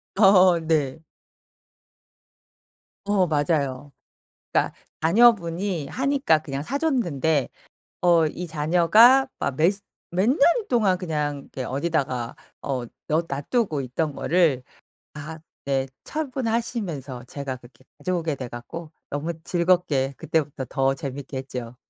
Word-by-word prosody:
어 185 -3 +6
네. 155 -3 0 2.1
어 200 -3 +2
맞아요. 145 -3 0 0.6
그러니까 - - +1 0.3
자녀분이 180 -4 +3
하니까 270 - +2
그냥 140 -2 -5
사 270 - -2
줬는데 160 - 0 0.5
어 170 -2 +5
이 180 +4 -5
자녀가 180 - +5
막 140 -1 -2
몇 165 +4 +4 0.4
몇 185 +4 +1
년 270 - +2 0.3
동안 210 -7 +3
그냥 150 -5 -2
이게 130 - -4
어디다가 135 -4 -2 0.3
어 130 -3 -2 0.2
넣 160 +2 +1
놔 140 +1 -3
두고 195 - 0
있던 140 +4 -2
거를 160 -7 +2
다 - - -33 1.0
이제 135 -1 0 0.2
처분하시면서 225 - -3
제가 135 0 -5
그렇게 120 0 -19 0.2
가져오게 170 -4 -1
돼 130 -2 -6
갖고 155 +7 -8 0.2
너무 150 +4 -2
즐겁게 170 -7 +1
그때부터 145 -4 -1
더 135 0 +1
재밌게 135 0 -6
했죠. 125 -3 -6
160 Hz, 240 characters per minute, -24 LUFS, 135-185 Hz, 2.1 s, 어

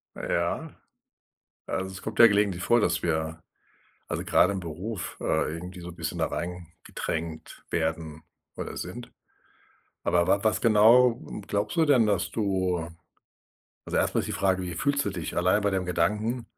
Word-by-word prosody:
Ja, - - -2 1.0
also, 95 - -2
es 95 - -9
kommt 110 -1 -6
ja 115 - +11
gelegentlich 100 -4 +1
vor, 120 - +4
dass - - +1
wir 80 -1 -1 0.7
also, - - -3
gerade 100 - +4
im 95 - -3
Beruf, 90 +4 -6
äh, 75 - 0
irgendwie 90 +2 -8
so 85 - -7
'n 85 - -10
bisschen 85 0 -4
da 80 - +1
reingedrängt 85 0 -6
werden 80 -1 -2 0.3
oder - - -6
sind, - - -7 0.9
aber 85 -1 +2
wa 100 - +2
was 110 -3 +2
genau, 115 +3 +5
ähm, - - -6
glaubst 105 - -2
du 160 - +5
denn, 130 -6 +5
dass 100 -4 0
du 95 -5 -1 1.0
also, - - -2
erstmal - - +2
ist - - -4
die - - -4
Frage: 95 -1 +1
„Wie 90 -2 -5
fühlst 140 - 0
du 100 - +1
dich 85 -5 -5
allein 90 +4 +3
bei 100 - +2
dem 95 -2 -1
Gedanken?” 105 +8 0
95 Hz, 165 wpm, -27 LUFS, 85-105 Hz, 1.0 s, ja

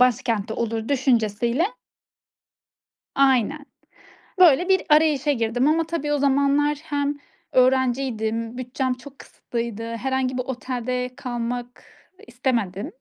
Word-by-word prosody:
başkentte 230 -4 +1
olur 225 -1 -2
düşüncesiyle 245 - +1 1.5
Aynen. 275 +2 +2 0.7
Böyle 355 +1 +6
bir 380 -1 +4
arayışa 300 -2 +4
girdim 245 +1 +1
ama 325 +1 +2
tabii 300 -3 -2
o - - +2
zamanlar 280 +1 +2
hem 285 -2 -2 0.3
öğrenciydim, 245 -3 +1
bütçem 255 +1 -2
çok 270 +2 -13
kısıtlıydı, 230 -2 -5
herhangi 260 +1 -1
bir 255 - -1
otelde 250 0 -3
kalmak 245 -1 -5 0.4
istemedim. 230 -6 -2
255 Hz, 100 wpm, -23 LUFS, 235-285 Hz, 1.5 s, Böyle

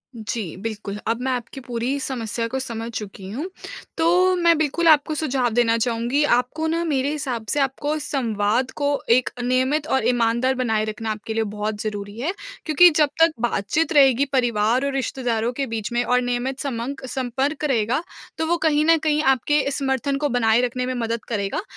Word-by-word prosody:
जी 215 -5 -4
बिल्कुल, 205 -1 -5
अब 230 +1 0
मैं 260 +1 -1
आपकी 250 +2 -4
पूरी 245 +3 -2
समस्या 235 -4 -2
को 265 +3 -3
समझ 230 -3 -4
चुकी 195 -2 -8
हूँ, 295 - -4 0.5
तो 360 +3 +3
मैं 340 -2 +4
बिल्कुल 315 +2 +1
आपको 310 0 +4
सुझाव 270 -5 0
देना 230 -1 +3
चाहूँगी। 240 +4 0
आपको 290 +4 +1
ना 335 +1 0
मेरे 280 -3 0
हिसाब 255 -7 -3
से 290 - +2
आपको 285 +3 -1
संवाद 245 -4 0
को 285 0 0 0.2
एक 245 +2 +4
नियमित 260 +5 +1
और 265 -6 +1
ईमानदार 240 +1 +2
बनाए 225 -4 0
रखना 220 +1 -4
आपके 215 +1 -5
लिए 225 0 +1
बहुत 210 0 -4
ज़रूरी 205 -1 -5
है 295 +8 -1 0.3
क्योंकि 345 +3 +7
जब 300 -2 +4
तक 330 0 +6
बातचीत 240 - 0
रहेगी 275 -2 +5
परिवार 240 0 +2
और 280 - 0
रिश्तेदारों 245 -3 -1
के 275 +2 -2
बीच 225 -2 -4
में 240 0 +1
और 250 0 +2
नियमित 245 +2 -2
समंक 265 0 -4
संपर्क 265 +4 -2
रहेगा, 245 0 +1 0.4
तो 320 - 0
वो 345 +1 +2
कहीं 305 -2 +2
न 330 0 +5
कहीं 305 -1 +1
आपके 275 +2 +2
समर्थन 275 0 -1
को 290 +1 0
बनाए 230 -2 +3
रखने 250 0 -1
में 255 - -2
मदद 230 -2 -2
करेगा। 200 - -2
255 Hz, 180 wpm, -22 LUFS, 230-285 Hz, 0.5 s, क्योंकि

